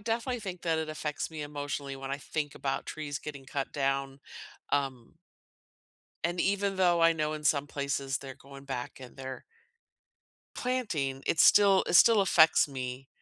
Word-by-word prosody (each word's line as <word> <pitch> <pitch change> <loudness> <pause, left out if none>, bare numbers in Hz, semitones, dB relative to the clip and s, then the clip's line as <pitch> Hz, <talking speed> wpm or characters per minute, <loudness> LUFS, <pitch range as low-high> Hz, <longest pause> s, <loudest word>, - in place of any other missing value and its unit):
definitely 235 +3 -2
think 185 -4 -6
that 165 -2 +1
it 160 -1 -3
affects 155 0 -4
me 155 -2 -6
emotionally 145 -1 -5
when 135 0 -7
I 140 - -1
think 145 +1 -4
about 135 -1 -3
trees 150 -2 -5
getting 140 -3 -8
cut 135 +1 -4
down, 135 -1 -1 0.5
um 135 -4 -2 1.1
and 175 +1 -1
even 200 +1 +1
though 175 -2 +3
I 165 0 +6
know 155 -1 -1
in 155 -1 -6
some 145 -1 +2
places 140 -1 -2
they're 135 -2 -9
going 140 0 -13
back 130 -2 -5
and 130 -2 -11
they're 130 -1 -7 1.1
planting, 175 - -2
it 160 - 0
still 200 0 +6
it - - -1
still 225 +3 +7
affects 165 -6 +5
me. 130 -1 -6
145 Hz, 165 wpm, -30 LUFS, 135-170 Hz, 1.1 s, still